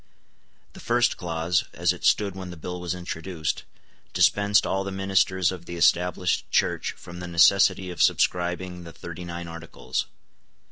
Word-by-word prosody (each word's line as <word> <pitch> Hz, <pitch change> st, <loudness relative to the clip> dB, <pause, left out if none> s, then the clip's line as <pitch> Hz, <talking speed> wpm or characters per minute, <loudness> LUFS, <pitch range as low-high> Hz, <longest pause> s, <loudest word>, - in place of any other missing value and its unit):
The -, -, -12 dB
first 120 Hz, 0 st, +2 dB
clause, 85 Hz, 0 st, -1 dB
as -, -, +1 dB
it -, -, -12 dB
stood 100 Hz, -2 st, +3 dB
when 95 Hz, -1 st, -7 dB
the 90 Hz, -, -9 dB
bill 90 Hz, +3 st, -6 dB
was 90 Hz, 0 st, -3 dB
introduced, 85 Hz, -2 st, -4 dB, 0.5 s
dispensed 100 Hz, 0 st, +3 dB
all 95 Hz, 0 st, 0 dB
the 100 Hz, -, -5 dB
ministers 95 Hz, -1 st, +1 dB
of 90 Hz, -2 st, -8 dB
the 85 Hz, -, -6 dB
Established 90 Hz, +1 st, +2 dB
Church -, -, +1 dB
from 85 Hz, 0 st, -11 dB
the 90 Hz, -, -6 dB
necessity 95 Hz, +2 st, +4 dB
of 90 Hz, -, -4 dB
subscribing 90 Hz, 0 st, +1 dB
the 85 Hz, -1 st, -10 dB
Thirty 85 Hz, +1 st, -8 dB
nine 85 Hz, 0 st, -6 dB
Articles. 85 Hz, 0 st, -5 dB
90 Hz, 155 wpm, -25 LUFS, 85-95 Hz, 0.5 s, necessity